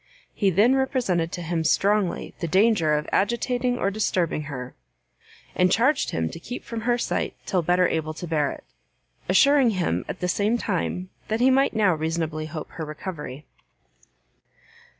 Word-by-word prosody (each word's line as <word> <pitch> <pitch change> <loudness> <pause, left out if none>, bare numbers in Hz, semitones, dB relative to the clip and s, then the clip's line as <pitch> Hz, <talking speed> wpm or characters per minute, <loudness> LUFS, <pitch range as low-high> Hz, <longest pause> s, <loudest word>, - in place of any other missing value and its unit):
He 200 - +2
then 205 +8 +4
represented 240 -11 0
to 175 - -4
him 165 0 -1
strongly 200 +3 +1
the 170 - -2
danger 185 -3 +3
of 150 0 -2
agitating 245 +4 0
or 195 - 0
disturbing 180 -7 -1
her, 130 -3 -6 0.8
and 180 0 +2
charged 265 +5 +2
him 80 0 -1
to - - -8
keep 245 +8 -7
from 230 -1 -5
her 240 +2 +1
sight - - -2
till 185 - +1
better 180 +2 +3
able 155 -1 -2
to 175 - -6
bear 155 -4 0
it; - - -10 0.7
assuring 280 -3 +5
him 90 - 0
at - - -5
the 180 - -1
same 210 +5 +1
time 185 -3 -2 0.2
that 220 +1 -1
he 255 +2 +5
might 270 +1 +2
now 205 -4 +3
reasonably 160 -1 -2
hope 155 0 -7
her 165 - -6
recovery. 150 -3 -7
180 Hz, 165 wpm, -24 LUFS, 160-230 Hz, 0.8 s, assuring